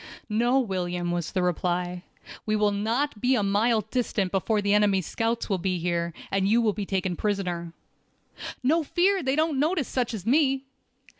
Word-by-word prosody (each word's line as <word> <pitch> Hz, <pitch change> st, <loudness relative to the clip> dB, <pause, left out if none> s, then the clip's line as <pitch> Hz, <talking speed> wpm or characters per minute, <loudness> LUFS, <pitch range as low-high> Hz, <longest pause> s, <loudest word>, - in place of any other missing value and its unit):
"No, 240 Hz, +5 st, +2 dB
William," 180 Hz, -6 st, -2 dB
was 175 Hz, -2 st, -2 dB
the 185 Hz, -3 st, 0 dB
reply. 180 Hz, 0 st, -1 dB, 0.4 s
"We 215 Hz, -, 0 dB
will 210 Hz, -1 st, +2 dB
not 225 Hz, +4 st, -1 dB
be 255 Hz, +1 st, +3 dB
a 210 Hz, -, +1 dB
mile 215 Hz, +3 st, +2 dB
distant 210 Hz, -4 st, -1 dB
before 205 Hz, +3 st, +1 dB
the 205 Hz, 0 st, +1 dB
enemy's 200 Hz, -3 st, +3 dB
scouts 230 Hz, +5 st, -1 dB
will 195 Hz, -3 st, 0 dB
be 185 Hz, 0 st, -1 dB
here, 170 Hz, 0 st, -1 dB, 0.2 s
and 195 Hz, 0 st, +1 dB
you 230 Hz, +3 st, +4 dB
will 220 Hz, -3 st, +2 dB
be 200 Hz, -2 st, -5 dB
taken 190 Hz, -2 st, -1 dB
prisoner." 180 Hz, -4 st, -2 dB, 0.9 s
"No 315 Hz, +6 st, +3 dB
fear, 370 Hz, +5 st, +2 dB
they 265 Hz, -1 st, 0 dB
don't 310 Hz, -2 st, +1 dB
notice 310 Hz, -1 st, +1 dB
such 245 Hz, -3 st, -1 dB
as 195 Hz, -3 st, -7 dB
me!" 270 Hz, +1 st, +2 dB
210 Hz, 175 wpm, -26 LUFS, 185-250 Hz, 0.9 s, you